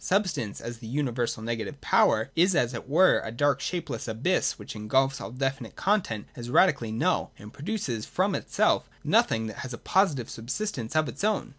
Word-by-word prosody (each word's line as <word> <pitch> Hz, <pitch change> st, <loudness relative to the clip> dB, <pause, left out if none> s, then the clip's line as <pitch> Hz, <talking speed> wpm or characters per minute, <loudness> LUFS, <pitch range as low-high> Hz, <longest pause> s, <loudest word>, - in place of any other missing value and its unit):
Substance, 185 Hz, -, 0 dB
as 120 Hz, -1 st, -6 dB
the 115 Hz, -, -9 dB
universal 120 Hz, -3 st, -1 dB
negative 115 Hz, +5 st, -4 dB
power, 110 Hz, +5 st, +3 dB
is 175 Hz, +2 st, +4 dB
as 125 Hz, -5 st, +2 dB
it 120 Hz, +2 st, -7 dB
were 185 Hz, +6 st, +5 dB
a 110 Hz, -, -5 dB
dark 145 Hz, +5 st, +1 dB
shapeless 145 Hz, -11 st, -3 dB
abyss 120 Hz, +12 st, 0 dB
which -, -, -9 dB
engulfs 135 Hz, +6 st, +1 dB
all -, -, -5 dB
definite 135 Hz, -1 st, -3 dB
content 185 Hz, -, 0 dB
as 120 Hz, 0 st, -7 dB
radically 140 Hz, -6 st, +3 dB
null, 110 Hz, -, 0 dB
and 105 Hz, +2 st, -12 dB
produces 145 Hz, -, -3 dB
from -, -, 0 dB
itself -, -, +1 dB
nothing 110 Hz, 0 st, +3 dB
that 110 Hz, -2 st, -6 dB
has 130 Hz, -1 st, -6 dB
a -, -, -5 dB
positive 155 Hz, -, +1 dB
subsistence 130 Hz, -, -4 dB
of 155 Hz, -1 st, +3 dB
its 130 Hz, -, -6 dB
own. 215 Hz, -1 st, +1 dB
130 Hz, 180 wpm, -27 LUFS, 115-160 Hz, -, were